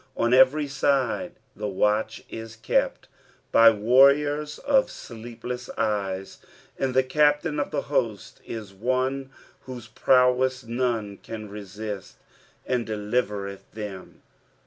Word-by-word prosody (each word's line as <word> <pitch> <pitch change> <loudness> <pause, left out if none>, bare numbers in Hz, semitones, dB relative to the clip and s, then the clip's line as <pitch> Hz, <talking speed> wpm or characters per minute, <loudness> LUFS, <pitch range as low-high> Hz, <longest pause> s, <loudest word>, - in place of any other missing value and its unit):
On 120 +1 +2
every 130 +3 +5
side 140 +4 0 0.2
the 105 - -4
watch 105 +2 0
is 115 -1 -8
kept 110 - 0 0.4
by 115 0 +8
warriors 140 +7 +4
of 275 -1 +2
aleepleas 120 +1 -8
cyeu, 95 -3 -2 0.4
and 130 -2 -1
the 130 - +5
Captain 150 +3 +2
af 145 - -1
the - - -2
host - - -2
is 110 -4 -7
one 130 +5 -1 0.4
whose 125 -3 -8
prowess 130 +1 +3
none 115 -4 -2
can 110 -1 -8
resist. 105 0 -7 0.5
"And 125 -2 -1
deliwreth 105 -2 -2
then." 105 -3 -8
120 Hz, 115 wpm, -25 LUFS, 105-130 Hz, 0.5 s, by